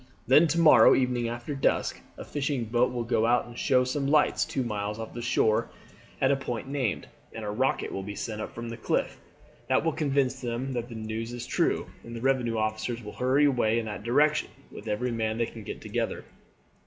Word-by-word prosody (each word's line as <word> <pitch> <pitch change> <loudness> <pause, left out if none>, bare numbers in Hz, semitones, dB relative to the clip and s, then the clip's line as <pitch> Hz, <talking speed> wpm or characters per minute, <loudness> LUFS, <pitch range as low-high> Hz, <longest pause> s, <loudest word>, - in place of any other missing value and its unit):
Then 150 +6 +6
to 165 +3 0
morrow 145 -9 +7
evening 125 -2 +1
after 120 +4 -5
dusk 135 - 0 0.2
a - - -8
fishing 140 -4 -2
boat 120 +3 +2
will 120 -1 -2
go 115 -1 +1
out 120 +1 +3
and 120 - -12
show 125 0 +3
some 135 +2 -1
lights 150 +1 +3
two 135 - -2
miles 105 -2 -3
off 115 0 -7
shore 110 -3 +2 0.5
at - - +3
the 140 - +4
point 130 -2 -4
named, 135 -7 -1 0.3
and 110 -1 -6
a 105 - -2
rocket 130 +5 0
will 95 - -3
be 100 +1 -6
sent 110 0 -4
up - - -7
from 115 0 -5
the 115 - -6
cliff. 110 - -1 0.5
That 130 +5 +2
will 165 - +2
convince 135 -3 0
them 120 +2 -3
that 120 0 -3
the 115 - -8
news 110 +1 -4
is 120 - -5
true, - - 0 0.2
and 115 0 -8
the 115 - -6
revenue 125 -3 +1
officers 110 +2 -2
will 105 - -8
hurry 130 +4 +3
away 120 -5 +2
in 115 - -1
that 105 -2 -5
direction 150 +7 +2 0.2
with 105 - -10
every 120 +4 -1
man 110 -1 -1
they 115 - +1
can 115 - -9
get 105 - -7
together. - - -3
120 Hz, 215 wpm, -28 LUFS, 110-135 Hz, 0.5 s, morrow